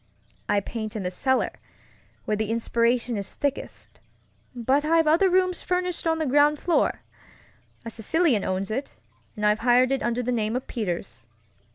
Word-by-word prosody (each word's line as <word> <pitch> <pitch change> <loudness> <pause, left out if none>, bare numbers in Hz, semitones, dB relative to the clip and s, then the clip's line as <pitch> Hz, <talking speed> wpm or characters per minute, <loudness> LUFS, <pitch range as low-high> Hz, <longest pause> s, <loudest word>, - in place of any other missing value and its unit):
I 205 -1 +3
paint 215 +1 -6
in 210 - -3
the 180 - -2
cellar, 260 +8 0 0.7
where 215 - 0
the 215 0 -2
inspiration 235 +1 +1
is 200 -1 -5
thickest, 285 -1 -4 0.6
but 260 +4 +1
I've 325 +1 +3
other 330 +5 +4
rooms 365 -1 +1
furnished 360 -2 -1
on 325 0 +2
the 315 - -1
ground 290 +2 +4
floor. 340 +3 0 0.8
A 230 - -5
Sicilian 250 - +1
owns 190 +2 -2
it, 265 +6 -4 0.4
and 210 - -2
I've 210 +1 +3
hired 250 +2 +4
it 270 0 0
under 240 +1 -1
the 250 - -1
name 220 -1 -1
of 255 - -3
Peters. 170 - -5
245 Hz, 165 wpm, -25 LUFS, 215-300 Hz, 0.8 s, other